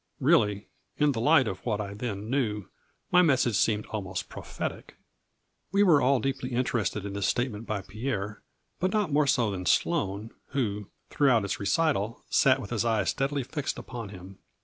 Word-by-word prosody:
Really, 105 -1 +3 0.3
in 150 -1 +3
the 115 -4 -2
light 145 -1 +5
of 95 -3 -5
what 110 -4 -1
I 100 -1 -4
then 105 -1 -4
knew, 110 -6 -1 0.5
my 180 - +7
message 130 - +3
seemed 105 +1 +2
almost 95 -4 -4
prophetic." - - -6 0.8
We 200 +1 +4
were 165 -7 +5
all 135 0 +3
deeply 130 0 -3
interested 115 -4 -1
in 100 - -5
this 100 -1 -1
state 125 +1 0
ment 105 +2 -8
by 105 -2 -2
Pierre, 105 -1 -4 0.4
but 185 +2 +1
not 210 -6 0
more 145 0 +3
so 120 -5 +2
than 90 -2 -4
Sloane, 110 - +1 0.2
who, 105 -7 -1 0.2
throughout 125 -8 +3
its 100 - -3
recital, 110 -1 0
sat - - +4
with 100 - -8
his 115 -2 0
eyes 110 -4 +1
steadily 140 0 -1
fixed 140 +3 -4
upon 115 -5 -7
him. 95 0 -11
115 Hz, 175 wpm, -28 LUFS, 100-135 Hz, 0.8 s, my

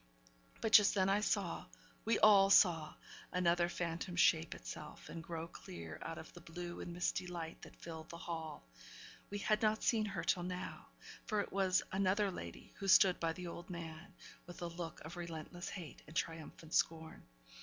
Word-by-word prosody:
But 225 - 0
just 210 -1 +8
then 190 -1 +3
I 200 +1 +4
saw 200 -4 0 0.4
we 230 - +3
all 200 -2 +7
saw 165 -6 +5 0.4
another 175 -1 +3
phantom 175 +1 -3
shape 165 -2 +4
itself, 150 - -8
and 165 - -6
grow 165 -1 -5
clear 85 - -9
out - - -5
of - - -10
the - - -11
blue 175 +1 -6
and 175 - -5
misty 180 +1 -1
light 170 -2 -6
that - - -12
filled 160 -1 -8
the 170 - -7
hall; 160 - -6 0.6
we 205 - -3
had 215 +1 +1
not 215 0 +2
seen 220 -3 +3
her 195 -5 -3
till 175 +1 +2
now, 180 +1 -5 0.4
for 215 -2 +1
it - - -6
was 190 -1 +3
another 195 +1 +2
lady 85 - -8
who 195 - -3
stood 190 -1 +7
by 165 -1 0
the 180 +1 -7
old 175 +1 -7
man, 170 +1 -7 0.3
with 175 0 -8
a - - -1
look 170 0 -6
of 160 +3 -8
relentless 170 +1 -6
hate 170 -6 -8
and 155 - -12
triumphant 160 -1 -4
scorn. 160 -1 +1
175 Hz, 180 wpm, -37 LUFS, 165-195 Hz, 0.6 s, just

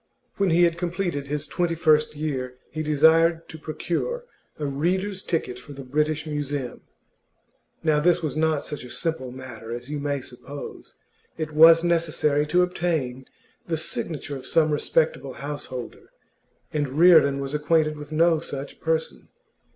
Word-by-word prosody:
When 200 -2 +2
he 175 +1 +4
had 170 0 +2
completed 175 -5 -2
his 150 +1 -2
twenty 165 +4 -1
first 155 -2 +3
year, 130 -4 -3
he 155 - -3
desired 160 +2 +4
to 160 - -9
procure 175 - -3 0.3
a 150 - -3
reader's 185 +8 -1
ticket 155 -9 -2
for 145 +3 -11
the 135 0 -8
British 150 +4 0
Museum. 145 -4 -3 1.0
Now 155 -2 +3
this 175 +2 +3
was 150 -3 -2
not 155 -2 +1
such 150 -3 -6
a 125 - -10
simple 160 -6 -2
matter 120 -3 -9
as 120 +4 -6
you 150 - -2
may 140 -1 -2
suppose; 135 +3 -9 0.4
it 155 -1 -3
was 165 +2 +8
necessary 155 -3 +1
to 180 +4 +4
obtain 160 -8 -2 0.4
the 165 -2 0
signature 155 -2 -3
of 135 - -8
some 155 -2 +3
respectable 145 -3 0
householder, 140 -3 -7 0.6
and 145 -3 0
Reardon 160 -5 +6
was 135 +1 -4
acquainted 155 +1 +2
with 150 0 -10
no 165 +1 +3
such 140 -3 -6
person. 160 0 -2
155 Hz, 150 wpm, -25 LUFS, 140-165 Hz, 1.0 s, was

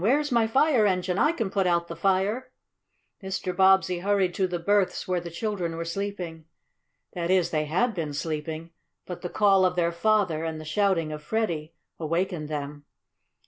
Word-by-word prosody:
Where's 280 +9 +2
my 235 -2 +3
fire 255 -2 +3
engine? 180 0 0
I - - +4
can 225 - -3
put 195 -2 +1
out 170 -1 +1
the 170 - -6
fire!" 195 +8 0 0.7
Mr. 190 -2 -3
Bobbsey 190 -1 +4
hurried 195 -1 +1
to 190 0 +1
the 180 -1 -2
berths 200 +2 +1
where 180 -1 +1
the 170 0 -7
children 175 -2 -3
were 165 - -3
sleeping. 175 -3 -5 0.7
That 170 -1 -3
is, 185 -2 +3
they 155 -1 0
had 205 +11 +1
been 155 -6 -4
sleeping, 160 +2 -4 0.3
but 180 - -7
the 175 - -4
call 195 -1 +4
of 180 -1 +2
their 170 -1 +1
father, 175 -3 +1
and 160 -1 -3
the 155 - -9
shouting 165 -1 +1
of 150 0 -6
Freddie, 165 -4 -2 0.3
awakened 165 -1 -2
them. 145 -1 -5
180 Hz, 180 wpm, -26 LUFS, 165-200 Hz, 0.7 s, I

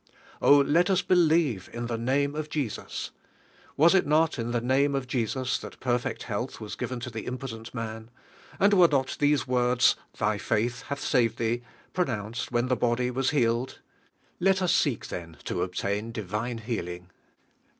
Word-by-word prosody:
Oh, 145 - +7
let 155 +6 +3
us 190 -1 +2
believe 160 - +2
in 120 0 -4
the 120 0 -2
name 135 +5 0
of 155 0 -4
Jesus! 140 -9 -4 0.7
Was 165 +5 +6
it 190 -5 +3
not 155 -1 +2
in 115 0 -2
the 120 0 0
name 135 +4 +2
of 135 -1 -1
Je.sus 125 +1 -1
that - - -10
perfect 125 -1 -1
health 120 +3 -4
was 110 -2 -7
given 125 -1 -4
to 125 0 -5
the 110 -1 -6
im 125 - -3
potent 115 -3 -7
man? 110 -1 -6 0.5
And 200 +1 +5
were 180 -3 +7
not 135 -4 0
these 145 -2 +3
words: 125 -1 +3 0.2
"Thy 105 -1 0
faith 115 +4 0
hath 140 0 -4
saved 115 -4 +2
Ihee," 115 +1 0 0.3
pronounced 115 - -2
when 120 +1 +1
the 125 - +2
body 125 +1 0
was 130 +1 0
healed? 120 -2 0 0.6
Let 190 0 +3
us 175 -1 +3
seek 140 -10 +1
then 85 -3 -7
to 90 - -2
obtain 100 +4 -2
divine 110 +3 -3
healing. 90 -6 -5
125 Hz, 170 wpm, -27 LUFS, 115-140 Hz, 0.7 s, Oh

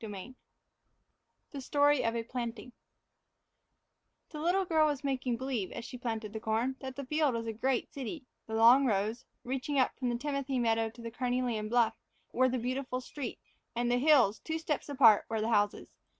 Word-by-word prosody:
VI 210 +3 -7 1.2
THE 280 - -6
STORY 290 +1 +3
OF 230 0 0
A 230 - -1
PLANTING 235 0 -5 1.6
THE 305 - -7
little 365 +4 +2
girl 315 -3 +3
was 290 -1 -2
making 260 -3 -1
believe, 250 -7 -3
as 235 - -6
she - - -8
planted 225 -3 -4
the 220 - -4
corn, 225 +4 -1
that 265 -1 -7
the 280 - -6
field 300 -2 +1
was 230 0 -3
a 225 - -3
great 250 +3 -1
city; 275 +2 -6 0.2
the 220 - -4
long 240 +5 +6
rows, 215 +2 -1 0.2
reaching 265 +3 -2
up 260 - +3
from 250 -2 0
the 240 - -1
timothy 275 0 -2
meadow 225 -2 +1
to 235 +1 -13
the 230 - -5
carnelian 245 -3 -1
bluff, 230 -1 +3 0.4
were 255 +1 +3
the 255 - -1
beautiful 255 +1 -2
streets; 255 0 -8 0.2
and 240 +1 0
the 245 - +2
hills, 260 -8 +4
two 320 0 -3
steps 310 -2 -3
apart, 240 -7 +6
were 220 - -1
the 220 +2 -1
houses. 205 -2 +1
250 Hz, 185 wpm, -31 LUFS, 225-275 Hz, 1.6 s, long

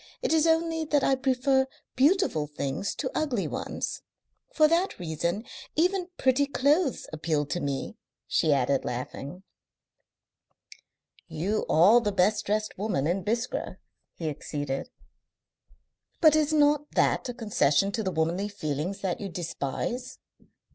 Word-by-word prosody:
It - - +1
is 320 0 +4
only 325 0 +2
that 295 -2 +2
I 275 - +3
prefer 265 0 +2 0.3
beautiful 275 - +2
things 145 +5 -3
to 260 - -3
ugly 260 -10 -1
ones. - - -4 0.5
For 310 -1 +5
that 340 +4 +1
reason 170 +5 -2 0.3
even 360 +2 +1
pretty 265 +2 +2
clothes 285 +2 +1
appeal 155 -1 0
to 160 +5 -3
me," 140 -3 -3 0.3
she 155 - +2
added, 135 -1 +2
laughing. 140 +8 -6 1.8
"You 175 +7 -2
are 200 +9 +6
the 210 -3 0
best 200 +2 +1
dressed 215 +1 -1
woman 200 -10 0
in 180 +4 0
Biskra," 230 +5 -2 0.4
he 165 - -4
acceded. 145 -2 -4 1.3
"But 310 -2 +6
is 310 -1 +2
not 295 -1 +3
that - - +2
a - - -3
concession 195 - +2
to 220 - -2
the 195 - -1
womanly 170 +4 0
feelings 165 -1 -4
that 190 0 -2
you 200 - -4
despise?" 180 - -4
210 Hz, 135 wpm, -27 LUFS, -, 1.8 s, are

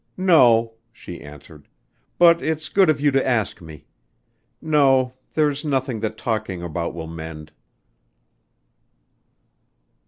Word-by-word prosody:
"No," 120 -11 +4 0.2
she 90 -6 -11
answered. 75 +1 -14 0.5
"But 170 -1 +5
it's 155 0 -3
good 190 -4 +3
of 150 -2 +2
you 145 0 +2
to 135 0 +1
ask 115 -6 -1
me. 80 -3 -12 0.7
No, 135 -5 +2 0.2
there's 150 -1 0
nothing 135 -5 -2
that 110 0 -4
talking 105 -6 -3
about 85 0 -4
will 80 -1 -6
mend." 80 -1 -9
120 Hz, 115 wpm, -21 LUFS, -, 0.7 s, But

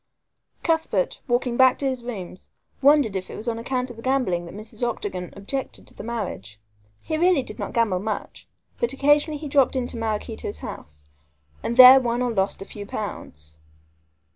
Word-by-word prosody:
Cuthbert, 330 +9 0
walking 245 -1 0
back 260 -1 +6
to 280 - -3
his 260 -2 -3
rooms, 190 -7 -7 0.3
wondered 280 -7 +4
if 185 -1 -4
it - - -7
was 220 - -7
on 230 -1 -1
account 250 +1 -2
of 235 - -12
the - - -9
gambling 235 -10 0
that 170 - -10
Mrs. 215 +2 -7
Octagon 200 -7 -3
objected 250 +7 -4
to - - -13
the - - -9
marriage. 190 - -5 0.4
He 315 - -2
really 350 -5 +4
did 215 - -8
not - - -4
gamble 220 -6 +1
much, 210 +2 -5 0.3
but 235 +2 +1
occasionally 290 +2 +3
he 300 +1 -7
dropped 275 -2 +3
into 245 -2 -2
Maraquito's 220 - -3
house, 75 0 -9 0.6
and 235 - -3
there 255 +1 +11
lost 240 -1 -1
or 250 -1 0
won 195 -1 +2
a - - -6
few 205 0 -9
pounds. 75 - -7
235 Hz, 180 wpm, -24 LUFS, 200-265 Hz, 0.6 s, there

